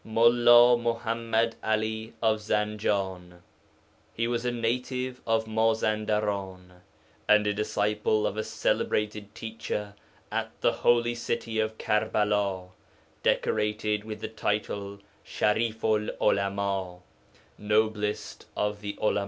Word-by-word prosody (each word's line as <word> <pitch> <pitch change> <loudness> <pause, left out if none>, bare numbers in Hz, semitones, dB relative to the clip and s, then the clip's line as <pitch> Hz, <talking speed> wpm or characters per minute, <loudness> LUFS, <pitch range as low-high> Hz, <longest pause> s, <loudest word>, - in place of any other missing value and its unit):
MULLĀ 120 +1 +6
MUḤAMMAD 115 -1 0
'ALI 110 +1 -1
OF 110 -1 +3
ZANJAN 100 -4 -2 0.7
He 115 +1 0
was 120 0 -1
a 125 - +1
native 125 +2 -2
of 115 0 +2
Mazandaran, 105 -4 -1 0.5
and 105 0 +6
a 105 - +1
disciple 105 +1 0
of - - -1
a 110 - -2
celebrated 105 -1 -1
teacher 110 -2 -5 0.4
at - - -3
the - - +4
holy 120 0 +2
city 115 -1 -3
of 110 0 -1
Karbala, 105 -3 0 0.5
decorated 105 0 0
with 110 -1 -7
the - - -3
title 105 -2 -3 0.3
Sharifu 110 0 0
'l - - -1
Ulama 100 -2 0 0.6
('noblest 105 0 -1
of 105 0 -1
the 100 -1 -5
Ulama'). 105 - +2
110 Hz, 110 wpm, -27 LUFS, 105-115 Hz, 0.7 s, MULLĀ